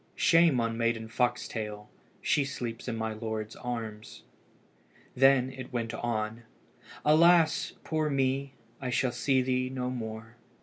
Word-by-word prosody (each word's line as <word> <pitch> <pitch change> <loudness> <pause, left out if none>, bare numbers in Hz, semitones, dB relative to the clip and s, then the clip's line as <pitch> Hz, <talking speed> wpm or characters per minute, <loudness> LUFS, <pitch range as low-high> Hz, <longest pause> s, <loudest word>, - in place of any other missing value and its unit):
Shame 165 -6 +4
on 115 0 -1
Maiden 115 -1 0
Foxtail! 110 -3 -2 0.4
she 145 - +3
sleeps 120 -5 -5
in 120 - -2
my 110 0 -2
lord's 110 -1 -4
arms." 110 -3 -6 0.9
Then 130 0 +5
it 130 0 -9
went 115 -2 -2
on 115 -1 -2 0.6
"Alas! 165 +1 +5
poor 155 -1 0
me! 135 0 0 0.3
I 130 - -2
shall 125 +1 +1
see 130 +2 +1
thee 130 0 0
no 125 -1 -3
more." 115 -1 -6
125 Hz, 130 wpm, -29 LUFS, 115-135 Hz, 0.9 s, Then